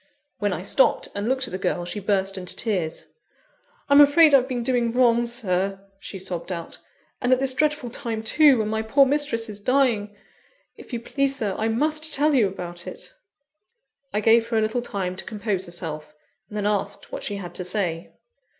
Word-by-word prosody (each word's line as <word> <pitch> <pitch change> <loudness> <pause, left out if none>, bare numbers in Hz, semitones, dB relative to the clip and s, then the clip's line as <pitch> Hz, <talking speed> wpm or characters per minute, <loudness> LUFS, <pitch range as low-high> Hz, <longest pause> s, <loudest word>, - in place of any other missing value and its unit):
When - - 0
I - - -4
stopped - - +2
and 205 +3 -2
looked 260 -1 +1
at - - -10
the 185 - -4
girl, 175 -1 -1
she 175 +4 -4
burst 195 -1 0
into 180 -2 -4
tears. 180 -8 -2 0.8
"I'm 285 +1 +7
afraid 295 +1 +6
I've 260 -2 +5
been 245 -3 -3
doing 240 -2 +1
wrong, 240 -1 +3
Sir," 195 -5 -1 0.2
she 195 - -7
sobbed 185 -1 -4
out, 170 -2 -6 0.4
"and 245 -1 +1
at 255 - +4
this 265 -1 +2
dreadful 300 -3 0
time 230 -4 -3
too, 285 +4 +5
when 215 -1 -1
my 220 0 -1
poor 270 +6 +4
mistress 275 -5 +1
is 210 -2 -6
dying! 225 -4 +1 0.6
If - - -14
you 240 - -3
please, 275 +3 -1
Sir, 215 -7 -1
I 220 - -1
must 305 +7 0
tell 300 +2 +3
you 240 -7 +4
about 175 -2 -7
it!" - - -8 1.0
I 210 - -1
gave 225 +1 +4
her 230 -1 -1
a - - +3
little 220 +3 -1
time 190 -6 -4
to - - -4
compose 205 -4 -3
herself; 155 -3 -6 0.3
and 210 - -7
then 205 - -2
asked 205 -1 -2
what - - -5
she 205 - -3
had 185 -3 -7
to 180 - -5
say. 180 -3 -3
220 Hz, 195 wpm, -24 LUFS, 195-260 Hz, 1.0 s, I'm